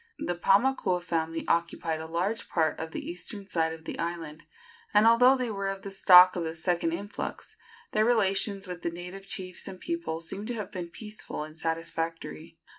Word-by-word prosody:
The 175 - -2
Paumakua 195 0 +2
family 165 -1 -2
occupied 170 -1 0
a 160 - -6
large 180 +7 -2
part 160 -3 +1
of 160 - -4
the - - -6
eastern 195 +4 -5
side 165 -4 0
of 160 0 -9
the - - -5
island, 165 -2 -4 0.5
and, 210 +1 +7
although 250 +3 +6
they 250 -3 -2
were 200 -1 -3
of 195 0 -5
the 195 - -6
stock 185 -1 +8
of 175 - -1
the 160 0 -4
second 170 0 0
influx, 200 +5 -5 0.4
their 215 - +3
relations 200 -3 +2
with 180 -2 -7
the - - -1
native 180 +3 -8
chiefs 185 -2 -2
and 190 -1 -8
people 335 - -3
seem 195 +6 -5
to 245 - -3
have 210 -3 -5
been 180 -4 -5
peaceful 210 -5 -6
and 155 0 -10
satisfactory. 165 - -3
180 Hz, 190 wpm, -28 LUFS, 165-200 Hz, 0.5 s, stock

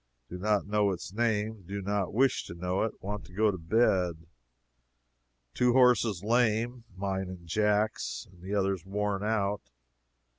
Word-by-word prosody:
Do 90 - -7
not 105 +1 +1
know 105 0 +2
its 95 0 -5
name 110 -1 0
do 100 +2 -4
not 100 -1 -1
wish 130 +4 +2
to 85 - -8
know 90 +2 -1
it 110 - -2
want 100 0 -4
to 90 - -17
go 105 +2 +3
to 95 - -5
bed. 90 -2 +1 1.3
Two 125 - +3
horses 120 -7 +4
lame 120 +1 +1
(mine 95 -1 -2
and 90 -2 -9
Jack's) 105 +4 0
and 90 -2 -19
the 95 +3 -3
others 95 -3 0
worn 100 +1 -2
out. 105 -2 0
105 Hz, 155 wpm, -29 LUFS, 95-110 Hz, 1.3 s, horses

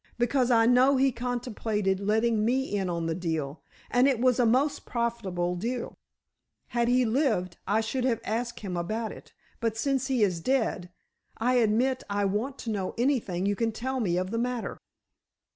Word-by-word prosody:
Because 245 +1 +2
I 225 -2 +5
know 255 +3 +5
he 270 +1 +3
contemplated 230 -5 -2
letting 215 +2 +1
me 255 0 0
in 190 -2 -1
on 170 -1 -2
the 165 - 0
deal, 160 -4 -3 0.3
and 250 +2 +4
it 265 -5 +2
was 255 0 +3
a 240 - +4
most 275 +5 +2
profitable 200 -7 -2
deal. 235 +6 -3 0.8
Had 235 -1 +1
he 250 +1 +3
lived, 220 - 0
I 210 +3 +2
should 250 +3 -2
have 235 -4 +1
asked 235 +2 -3
him 190 -4 -4
about 215 +6 -2
it, - - -12 0.3
but 225 -2 -1
since 270 +1 0
he 255 -5 +2
is 180 -4 +1
dead, 220 -6 0 0.5
I 245 +3 +1
admit 245 +3 +2
I 200 0 0
want 220 +8 -1
to 230 - -3
know 195 -3 -3
anything 230 -8 0
you 205 0 +1
can 225 +2 0
tell 260 +4 -3
me 180 -7 0
of 185 +1 -2
the 230 - -1
matter." 245 -1 -3
230 Hz, 180 wpm, -28 LUFS, 200-250 Hz, 0.8 s, I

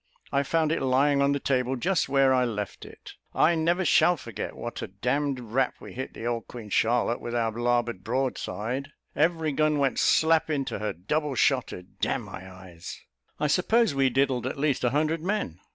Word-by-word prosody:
I 140 - +2
found 155 +2 +1
it 165 - 0
lying 140 +2 +3
on 140 0 +3
the 140 - 0
table 130 -1 0
just 170 +4 0
where 135 -1 +4
I 130 -1 +3
left 105 -4 -4
it. - - -12 0.2
I 165 - +4
never 170 +3 +1
shall 170 +2 +4
forget 115 -6 -6
what 120 - -6
a - - -4
d - - -26
d 135 +2 0
rap 125 +3 0
we - - -10
hit 130 +1 -6
the 115 - -7
old 120 -1 -2
Queen 110 -4 -9
Charlotte, 120 +2 +1
with 120 0 -4
our 115 -1 +1
larboard 120 -3 -1
broadside; 130 +2 -3 0.2
every 160 0 +1
gun 155 +1 +2
went 135 -4 +1
slap 160 0 +3
into 140 -8 -2
her, 105 +1 -2
double 145 - -2
shotted. 125 -9 0
D - - 0
n - - -1
my 95 0 -9
eyes, 90 -2 -10 0.4
I - - 0
suppose 205 +7 +2
we 135 -1 +3
diddled 130 -1 +1
at 130 - -4
least 140 -2 0
a 125 - +3
hundred 155 +4 0
men." 175 - -2
135 Hz, 200 wpm, -27 LUFS, 120-150 Hz, 0.4 s, where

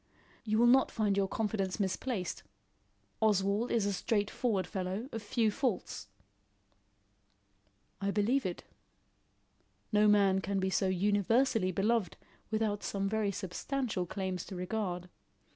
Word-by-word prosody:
"You 215 -1 +1
will 235 - +5
not 260 +2 +5
find 210 -3 0
your 195 -1 +2
confidence 200 -2 -2
misplaced. 195 - -2 0.8
Oswald 205 +1 +2
is 225 -4 +2
a 200 - 0
straightforward 205 0 0
fellow, 190 +5 -3
of 225 - -4
few 215 +1 +1
faults." 240 -2 -2 1.9
"I 200 - 0
believe 215 +7 +2
it. 180 -3 -4 1.3
No 210 0 +4
man 200 -2 +4
can 195 +1 -1
be 190 0 0
so 190 - +2
universally 205 +3 +2
beloved 200 0 0 0.3
without 215 -2 0
some 195 -1 -2
very 210 -1 0
substantial 205 +1 -3
claims 185 -1 -3
to 190 - -8
regard. 180 -1 -3
205 Hz, 125 wpm, -32 LUFS, 190-220 Hz, 1.9 s, will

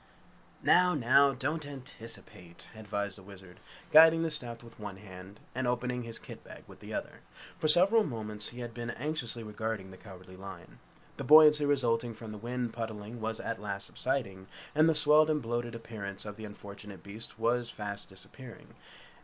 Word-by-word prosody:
"Now, 180 -1 +5
now, 140 +1 +5
don't 150 +5 -2
anticipate!" 115 -10 -9
advised 100 -2 -4
the - - -13
Wizard, 95 -2 -13 0.3
guiding 160 +1 +8
the 165 - -1
staff 120 -6 -5
with 115 - -14
one 105 -2 -6
hand 95 0 -11
and 130 0 -1
opening 125 0 -1
his 115 -1 -6
kit - - -11
bag - - -12
with - - -15
the - - -10
other. - - -5 0.4
For 155 - +1
several 190 +8 +6
moments 105 - -2
he 120 +1 -7
had 120 -1 -6
been 120 0 -5
anxiously 125 -3 -2
regarding 105 -2 -4
the 95 - -12
Cowardly 95 -2 -12
Lion. 95 -2 -10 0.4
The - - -4
buoyancy 150 -1 +8
resulting 120 -4 +1
from 110 0 -9
the 105 - -7
wind 120 +1 -3
pudding 110 0 -6
was 110 0 -3
at 115 - -4
last 100 -1 -4
subsiding, 100 -8 -3 0.3
and 155 +2 +5
the 160 - +3
swelled 150 +1 +6
and 155 -1 +2
bloated 120 -1 -3
appearance 105 -4 -7
of 105 -1 -6
the 110 0 -8
unfortunate 100 -1 -10
beast 110 +4 -7
was 120 +1 +1
fast 105 -2 -6
disappearing. 100 +6 -12
115 Hz, 175 wpm, -31 LUFS, 105-135 Hz, 0.4 s, guiding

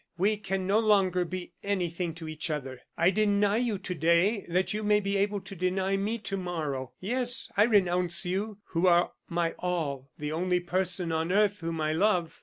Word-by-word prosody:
"We 200 +5 +2
can 195 -2 -3
no 200 +3 +3
longer 195 -5 +2
be 180 +1 -6
anything 175 -4 -2
to 165 -1 -8
each 155 +1 -4
other. 135 -4 -4 0.2
I 170 +3 +4
deny 205 0 +2
you 235 -4 0
to 185 -1 -5
day, 170 +6 +2
that 180 +3 +1
you 210 - -2
may 210 0 +3
be 200 -1 -2
able 200 0 0
to 195 +1 -10
deny 190 +2 0
me 205 +4 -1
to 200 -2 -4
morrow. 155 -8 -4
Yes, 245 +5 +2
I 210 - +5
renounce 180 -5 +2
you, 195 +4 -2
who 175 +1 +1
are 175 0 +4 0.2
my 170 -1 0
all 145 -7 -3
the 150 0 -4
only 180 +3 0
person 180 -1 +1
on 160 +2 -1
earth 205 +1 +2
whom 165 -1 -4
I 155 0 0
love. 180 -2 +1
185 Hz, 195 wpm, -28 LUFS, 170-200 Hz, 0.2 s, I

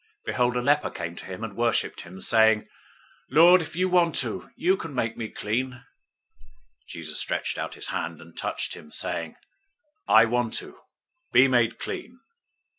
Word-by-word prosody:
008:002 - - -45
Behold, 125 -1 +1
a 125 - +1
leper 145 +3 +2
came 85 0 -6
to - - -10
him 95 +2 -7
and 110 -3 -6
worshiped 120 +1 0
him, 90 +2 -11
saying, 110 +1 +4 0.6
"Lord, 170 +6 +7
if 160 - -7
you 185 +2 +1
want 175 -3 +3
to, 120 -4 -2
you 185 +3 +2
can 165 -6 -7
make 115 -2 -1
me 110 -2 -5
clean." 125 +5 -2
008:003 130 - -14 1.1
Jesus - - -3
stretched - - -1
out - - -4
his - - -3
hand, 85 -2 -4
and 85 0 -15
touched - - -3
him, 75 - -11
saying, 80 -1 -3 0.7
"I 110 +1 +7
want 120 0 -1
to. - - -5 0.5
Be 130 - +6
made 120 -3 +2
clean." 245 +3 -6
120 Hz, 175 wpm, -26 LUFS, 110-145 Hz, 1.1 s, Lord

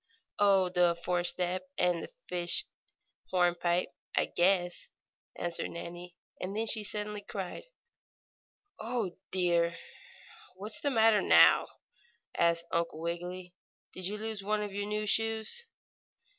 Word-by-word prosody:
"Oh, 195 -3 +5
the 175 -1 +3
four 180 -1 +1
step 180 +1 -1
and 175 -1 +2
the - - -7 0.2
fish 175 -1 +1 0.6
hornpipe, 175 -1 +2 0.3
I - - +3
guess," 175 - +2 0.5
answered 175 -1 -2
Nannie, 175 +1 -8 0.2
and 195 +3 -4
then 225 - 0
she 220 -1 +1
suddenly 210 0 -2
cried: 195 - -6 1.1
"Oh, 225 -5 -2
dear!" 170 -2 +2 0.8
"What's 210 +3 -4
the 285 - +1
matter 225 -4 +5
now?" - - +7 0.7
asked 170 0 +2
Uncle 170 -1 -1
Wiggily. 175 +2 -5 0.4
"Did 185 -1 -4
you 210 +2 -3
lose 220 -1 -3
one 210 +1 0
of 205 -2 -5
your 205 +1 -2
new 210 0 -1
shoes?" 225 - 0
185 Hz, 125 wpm, -31 LUFS, 175-210 Hz, 1.1 s, now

